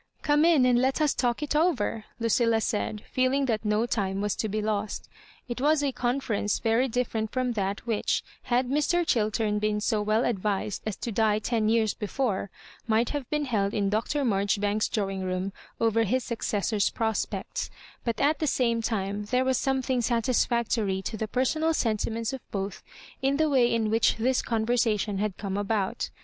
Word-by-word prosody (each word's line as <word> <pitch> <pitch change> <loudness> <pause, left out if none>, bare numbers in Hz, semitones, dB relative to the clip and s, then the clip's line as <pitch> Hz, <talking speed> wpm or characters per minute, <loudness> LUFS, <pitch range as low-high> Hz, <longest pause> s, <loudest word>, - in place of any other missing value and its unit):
"Come 295 +1 +4
in 320 -7 +5
and 245 -1 +4
let 265 +3 +1
us 305 -2 +3
talk 245 +3 0
it 295 - -2
over," 275 -9 +1
Lnoilla 230 0 +2
said, 215 -1 -2
feeling 260 +2 +2
that 225 -4 -1
no 210 +1 +1
time 195 -5 -1
was 205 0 0
to 220 - -1
be 215 +2 -1
lost 210 0 -2 0.4
It 245 0 -4
was 295 +1 +3
a 280 - +1
conference 240 -5 -1
very 230 +3 +2
different 225 -3 -1
from 255 -1 0
that 200 -1 -2
whidi, 225 -3 0 0.2
had 250 +1 +1
Mr. 300 +6 +1
Ohiltem 215 -4 +1
been 210 0 0
so 215 0 0
well 215 +3 +1
advised 205 -2 -1
as 215 - -2
to 235 - -5
die 215 0 +2
ten 215 0 0
years 220 -2 +2
before, 210 -2 -2 0.4
might 225 +1 +2
have 285 -4 -4
been 300 -1 0
held 205 -6 0
in 200 -2 +1
Dr. 250 +7 0
Marjoribanks's 205 0 +1
drawing 195 -4 -2
room 185 +1 -2 0.3
over 230 0 +2
his 245 +4 0
saooessor's 210 -2 0
prospects; 225 - -2 0.3
but 235 -2 -2
at 295 +3 +2
the 310 - 0
same 235 -4 +1
time 205 -2 -2
there 250 +4 +1
was 260 -1 +2
some 265 -1 0
thing 255 -1 0
satisfoctory 230 -4 +1
to 220 - -4
the 220 0 -3
personal 310 +8 +1
sentiments 225 0 -1
of 265 - -5
both 195 0 -4 0.4
in 275 +1 +2
the 315 0 +3
way 245 -3 +4
in 220 -2 +1
which 225 0 +3
this 250 +3 +1
conversation 220 -3 0
bad 205 -1 -2
come 195 -2 -3
about. 205 -1 -1
225 Hz, 180 wpm, -27 LUFS, 210-255 Hz, 0.4 s, in